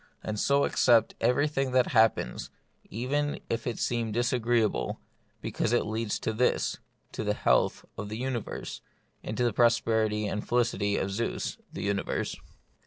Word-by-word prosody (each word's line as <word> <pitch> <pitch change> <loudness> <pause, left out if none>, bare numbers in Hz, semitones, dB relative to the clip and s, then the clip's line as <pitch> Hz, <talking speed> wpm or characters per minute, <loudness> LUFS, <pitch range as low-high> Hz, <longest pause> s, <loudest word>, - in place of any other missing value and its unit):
And 105 -1 -3
so 140 +4 +3
accept 115 -3 +4
everything 135 0 +1
that 130 -1 +3
hap 110 -2 +5
pens, - - -5 0.4
even 145 +7 -1
if 115 +1 -2
it 120 - -2
seem 115 -2 -1
disagreeable, 120 -1 +1 0.4
because 115 - -1
it 120 - +2
leads 110 0 -2
to 110 - -1
this, 125 +3 +1 0.3
to - - -4
the - - 0
health - - +2
of 100 - -4
the 110 - -4
universe, 125 -2 -4 0.4
and 110 - -4
to 125 - +1
the 120 -3 +2
prosperity 110 -2 +2
and 105 +1 -2
felicity 110 -4 +1
of 95 - -1
Zeus 115 +4 -2
(the - - -5
uni 100 -1 +1
verse.) - - -2
115 Hz, 160 wpm, -28 LUFS, 110-125 Hz, 0.4 s, hap